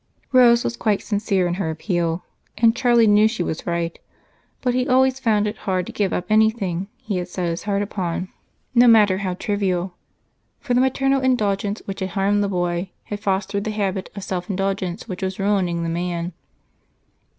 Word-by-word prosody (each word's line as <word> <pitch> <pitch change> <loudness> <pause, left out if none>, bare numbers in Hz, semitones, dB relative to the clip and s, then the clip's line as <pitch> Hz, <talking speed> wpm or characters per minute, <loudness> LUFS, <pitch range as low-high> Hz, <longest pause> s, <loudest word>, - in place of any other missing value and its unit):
Rose 245 -2 +6
was 235 - -2
quite 210 -3 0
sincere 200 -3 0
in 175 - 0
her 160 - -1
appeal, 170 0 -2 0.3
and 225 0 +4
Charlie 240 -3 +4
knew 210 0 +5
she 220 -5 -2
was 160 - -4
right, 170 -1 -2 0.6
but 250 -1 0
he 255 +1 0
always 260 0 +3
found 215 -5 +2
it 210 - -3
hard 185 -1 0
to - - -7
give 200 -3 -1
up 180 - -2
anything 215 -4 +2
he 205 -4 -4
had 180 -1 -3
set 180 0 -3
his 165 +1 -3
heart 205 0 -2
on, 180 +1 -2 0.4
no 245 0 +6
matter 210 -5 +5
how 185 -2 -2
trivial, 190 -3 -1 0.7
for 265 -3 -2
the 245 - +4
maternal 270 +1 +2
indulgence 210 -5 0
which 195 - -5
had 190 - -2
harmed 200 +2 +1
the 200 - -1
boy 175 0 -1
had 205 - -6
fostered 200 0 -1
the 215 - -3
habit 200 -3 -2
of 200 - -6
self 180 -1 -4
indulgence, 195 -1 -2
which 185 - -6
was 190 0 -2
ruining 190 -4 0
the - - -2
man. 170 +1 -3
200 Hz, 185 wpm, -22 LUFS, 180-220 Hz, 0.7 s, Rose